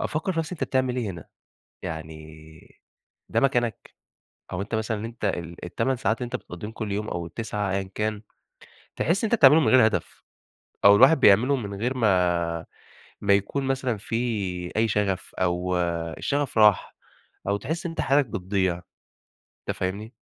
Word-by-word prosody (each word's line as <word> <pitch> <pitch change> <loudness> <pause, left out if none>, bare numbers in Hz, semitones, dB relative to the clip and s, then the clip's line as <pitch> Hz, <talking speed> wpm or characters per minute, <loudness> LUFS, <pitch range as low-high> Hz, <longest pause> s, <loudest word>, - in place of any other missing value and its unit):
أفكّر 155 +5 -1
في 165 - -4
نفسي 160 +2 -2
أنت - - -2
بتعمل 130 -1 0
إيه 115 -6 -2
هنا؟ 85 -4 -9 0.6
يعني 80 -1 -7 1.0
ده - - +2
مكانك؟ 120 -4 0 0.6
أو 90 - -3
أنت 105 +3 -3
مثلًا 110 0 -2
أنت 115 -1 -6
ال 85 -3 -3
ال8 115 +9 -1
ساعات 110 -1 0
اللي 125 - -4
أنت 120 - -5
بتقضّيهم 105 +5 -7
كل 110 -2 -5
يوم 105 +2 -2
أو 85 -1 -4
ال9 105 +2 -3
أيًا 95 0 -2
كان، 105 -1 -2 0.7
تحس 175 +7 0
إن 220 - +1
أنت - - +5
بتعملهم 150 +3 +7
من - - +4
غير 130 -4 +7
هدف، 110 - -4 0.6
أو 100 0 +9
الواحد 130 +7 +6
بيعملهم 125 +5 +5
من 100 -1 -5
غير 125 +3 -1
ما 85 -6 +1 0.5
ما 100 - +2
يكون 100 +8 -1
مثلًا 130 -3 -1
في 105 +2 -7 0.6
أي 115 +1 +2
شغف، 100 -2 -1
أو 90 0 0 0.4
الشغف 140 -4 -1
راح، 105 -3 +4 0.5
أو 100 +1 +1
تحس 160 - -4
إن 170 - -2
أنت 165 - -3
حالك 140 +1 +3
بتضيع، 95 -4 -1 0.9
أنت - - -2
فاهمني؟ 100 +5 -3
105 Hz, 165 wpm, -25 LUFS, 95-130 Hz, 1.0 s, أو